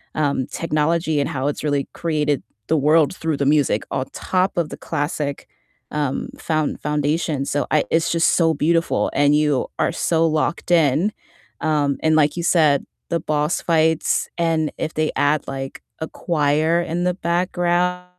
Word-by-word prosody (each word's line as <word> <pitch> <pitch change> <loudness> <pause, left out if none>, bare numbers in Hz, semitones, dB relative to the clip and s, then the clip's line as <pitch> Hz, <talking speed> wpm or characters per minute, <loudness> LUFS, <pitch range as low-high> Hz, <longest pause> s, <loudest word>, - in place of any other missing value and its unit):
um, 140 -4 0
technology 160 0 0
and 140 - 0
how 135 0 -2
it's 145 - -2
really 145 -2 0
created 150 -4 0 0.3
the 160 - +2
world 150 +3 +3
through 160 -4 -2
the 140 - 0
music 145 -7 +2
on 130 -1 -1
top 185 +1 0
of 170 -3 0
the - - -8
classic, 145 -2 -3 0.4
um, 145 -3 -2
found 155 -2 -1
foundation. 150 0 0
So 145 0 -1
I 150 - +3
it's 165 0 +2
just 170 0 +3
so 165 -2 +3
beautiful, 165 +3 +1
and 145 +1 +3
you 150 -3 +1
are - - +2
so 165 -1 +1
locked 155 +3 -1
in. 165 +3 +3 0.5
Um, 145 -3 +1
and 160 0 +3
like 150 +1 +3
you 170 - -2
said, 155 -5 +3 0.2
the 170 - 0
boss 150 +2 -1
fights 160 -1 +1
and 160 -2 +1
if 160 - -3
they 155 0 0
add 145 0 +1
like 135 0 -6 0.2
a 160 - -3
choir 155 0 +1
in 170 +1 -2
the 180 - +2
background, 175 0 0
155 Hz, 165 wpm, -21 LUFS, 145-165 Hz, 0.5 s, world